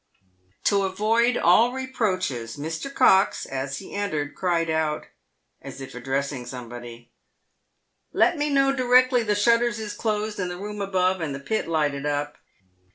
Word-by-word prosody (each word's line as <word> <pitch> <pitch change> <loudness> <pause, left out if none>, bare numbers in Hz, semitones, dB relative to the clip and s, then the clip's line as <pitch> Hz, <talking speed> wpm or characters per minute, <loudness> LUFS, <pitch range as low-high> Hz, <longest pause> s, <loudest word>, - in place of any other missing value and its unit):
To 200 -1 +3
avoid 220 +5 +2
all 220 +9 +4
reproaches, 185 - -2
Mr. 160 - -5
Cox, 195 -8 +4
as 135 +1 -4
he 195 - -10
entered, 155 -8 -2
cried 170 -3 0
out, 160 -1 -1 0.6
as - - -9
if 135 - -8
addressing 135 0 -3
somebody, 120 -1 -9 0.5
" - - -50 0.3
Let 350 - +3
me 295 -1 -1
know 275 -1 +3
directly 255 0 +4
the 210 -2 0
shutters 235 +3 +3
is 215 -2 -5
closed 215 -1 -2
in 185 - -1
the 180 0 -5
room 210 +2 -6
above, 185 -2 +1
and 145 -4 -3
the - - -6
pit 215 +11 -2
lighted 150 -3 0
up." 145 0 -2
185 Hz, 155 wpm, -24 LUFS, 145-225 Hz, 0.6 s, all